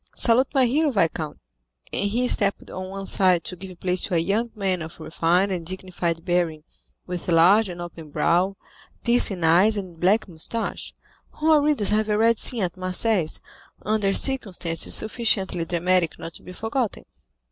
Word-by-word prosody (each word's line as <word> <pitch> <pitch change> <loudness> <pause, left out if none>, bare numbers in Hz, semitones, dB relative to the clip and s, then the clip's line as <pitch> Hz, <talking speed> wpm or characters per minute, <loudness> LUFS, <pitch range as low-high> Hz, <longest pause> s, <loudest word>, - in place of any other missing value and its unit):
Salute 250 +3 +3
my 265 -2 +5
hero, 295 +6 +2
viscount." 165 - -1 0.6
And 200 - 0
he 245 +4 0
stepped 200 -4 0
on 185 0 -6
one 195 0 -6
side 185 -3 +2
to 180 - -6
give 185 -1 -11
place 180 0 -1
to 180 - -2
a - - +4
young 205 +8 0
man 190 -4 -1
of 160 +1 -8
refined 170 +4 +1
and 180 -3 -2
dignified 175 -2 -3
bearing, 175 -4 0 0.4
with 180 -1 -6
large 185 +5 +5
and 175 -1 -7
open 170 -3 -8
brow, 175 +6 +1 0.5
piercing 235 -7 +2
eyes, 185 +7 +5
and 180 -4 -7
black 210 +5 +2
moustache, 180 +7 -5 0.4
whom 315 +1 +1
our 305 -2 +6
readers 285 -9 +2
have 215 0 +1
already 225 +2 +3
seen 235 -5 +1
at 180 0 -3
Marseilles, 185 -1 0 0.4
under 210 -2 +1
circumstances 195 -10 0
sufficiently 205 -6 0
dramatic 175 -1 +1
not 165 0 -8
to - - -11
be - - -11
forgotten. 225 +4 -3
185 Hz, 165 wpm, -24 LUFS, 175-220 Hz, 0.6 s, our